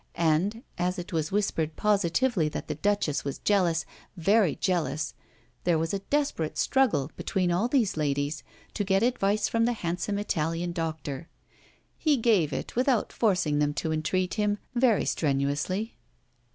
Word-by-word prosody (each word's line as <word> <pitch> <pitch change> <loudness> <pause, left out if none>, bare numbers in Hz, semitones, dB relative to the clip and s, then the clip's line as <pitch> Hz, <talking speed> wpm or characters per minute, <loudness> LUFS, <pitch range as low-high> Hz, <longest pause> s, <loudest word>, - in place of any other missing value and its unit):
And, 170 +8 +1 0.2
as 180 +2 0
it 175 0 -6
was 160 -1 -1
whispered 165 -6 0
positively 205 -2 +2
that - - -6
the - - -2
Duchess 160 -2 0
was 140 -1 -4
jealous, 175 -6 +2 0.3
very 195 0 +3
jealous, 165 -4 -1 0.5
there 175 -2 +3
was 165 +3 -1
a 200 - 0
desperate 200 - -1
struggle 250 - +2
between 180 -2 0
all 185 +7 +2
these 245 -6 +1
ladies 145 0 -1 0.3
to 205 - -1
get 195 +1 +2
advice 215 -4 +1
from 230 0 +1
the 240 - +1
handsome 180 0 -2
Italian 170 -3 -1
doctor. 160 -2 -4 0.7
He 305 -3 +3
gave 210 - +3
it - - -5
without 250 -2 +1
forcing 180 -9 +1
them 145 0 +1
to 160 - -2
entreat 180 +4 0
him 210 -1 +1 0.2
very 240 -3 +3
strenuously. 150 +9 -1
180 Hz, 150 wpm, -27 LUFS, 155-210 Hz, 0.7 s, very